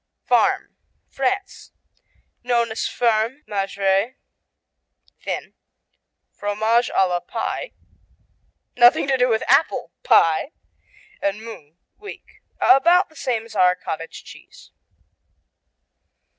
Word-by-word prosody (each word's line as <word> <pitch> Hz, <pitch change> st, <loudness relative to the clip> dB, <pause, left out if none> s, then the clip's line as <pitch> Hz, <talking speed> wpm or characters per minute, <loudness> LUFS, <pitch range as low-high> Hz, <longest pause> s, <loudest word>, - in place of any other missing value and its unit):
Farm -, -, +1 dB, 0.3 s
France 385 Hz, +9 st, -3 dB, 0.7 s
Known 235 Hz, -2 st, 0 dB
as 220 Hz, -, -2 dB
Ferme; 235 Hz, +4 st, 0 dB
Maigre 195 Hz, +3 st, -1 dB, 1.1 s
(thin); -, -, -5 dB, 0.8 s
Fromage 220 Hz, +4 st, 0 dB
à 190 Hz, -, +4 dB
la 175 Hz, -1 st, -1 dB
Pie 180 Hz, -, -5 dB, 1.0 s
(nothing 245 Hz, +2 st, +5 dB
to 270 Hz, -, +2 dB
do 250 Hz, -1 st, +2 dB
with 220 Hz, -1 st, +1 dB
apple 285 Hz, +4 st, +2 dB
pie); 165 Hz, -, +3 dB, 0.7 s
and 200 Hz, +2 st, -2 dB
Mou 160 Hz, -9 st, -11 dB, 0.2 s
(weak). 410 Hz, 0 st, -12 dB, 0.2 s
About 345 Hz, +7 st, +4 dB
the 315 Hz, -, -23 dB
same 240 Hz, -6 st, -2 dB
as 230 Hz, -, -13 dB
our 180 Hz, 0 st, +4 dB
cottage 165 Hz, -2 st, -7 dB
cheese. -, -, -16 dB
230 Hz, 100 wpm, -21 LUFS, 195-265 Hz, 1.1 s, nothing